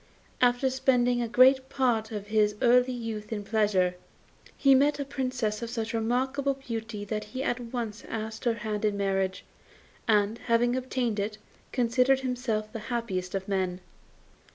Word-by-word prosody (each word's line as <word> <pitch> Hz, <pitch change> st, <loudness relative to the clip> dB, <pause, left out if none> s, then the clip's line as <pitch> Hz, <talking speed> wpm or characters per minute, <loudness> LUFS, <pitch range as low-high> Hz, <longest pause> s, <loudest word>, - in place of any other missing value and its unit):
After 245 Hz, +1 st, +3 dB
spending 250 Hz, -2 st, +2 dB
the 240 Hz, -, -1 dB
greater 255 Hz, +3 st, +6 dB
part 245 Hz, -4 st, 0 dB
of 205 Hz, -2 st, -5 dB
his 210 Hz, -1 st, +2 dB
early 250 Hz, +1 st, +4 dB
youth 225 Hz, -3 st, -5 dB
in 210 Hz, -2 st, -3 dB
pleasure, 205 Hz, -4 st, +2 dB, 0.6 s
he 275 Hz, -1 st, +5 dB
met 285 Hz, +3 st, +3 dB
a 280 Hz, -, -2 dB
Princess 255 Hz, -6 st, -2 dB
of 235 Hz, -, -4 dB
such 225 Hz, -2 st, -3 dB
remarkable 260 Hz, +5 st, 0 dB
beauty 225 Hz, -5 st, -5 dB
that 210 Hz, +1 st, -3 dB
he 255 Hz, +5 st, -5 dB
at 245 Hz, -, -1 dB
once 230 Hz, -3 st, -5 dB
asked 220 Hz, +1 st, -5 dB
her 235 Hz, -1 st, +2 dB
hand 210 Hz, -1 st, -2 dB
in 210 Hz, -1 st, +1 dB
marriage, 195 Hz, -1 st, -1 dB, 0.6 s
and, 210 Hz, +1 st, +2 dB
having 240 Hz, +1 st, +2 dB
obtained 250 Hz, -4 st, -1 dB
it, 210 Hz, +1 st, -2 dB, 0.3 s
considered 255 Hz, +2 st, +2 dB
himself 245 Hz, -4 st, -2 dB
the 225 Hz, -, -4 dB
happiest 195 Hz, -7 st, -2 dB
of 190 Hz, -1 st, -3 dB
men. 185 Hz, -2 st, -1 dB
230 Hz, 155 wpm, -28 LUFS, 210-255 Hz, 0.6 s, greater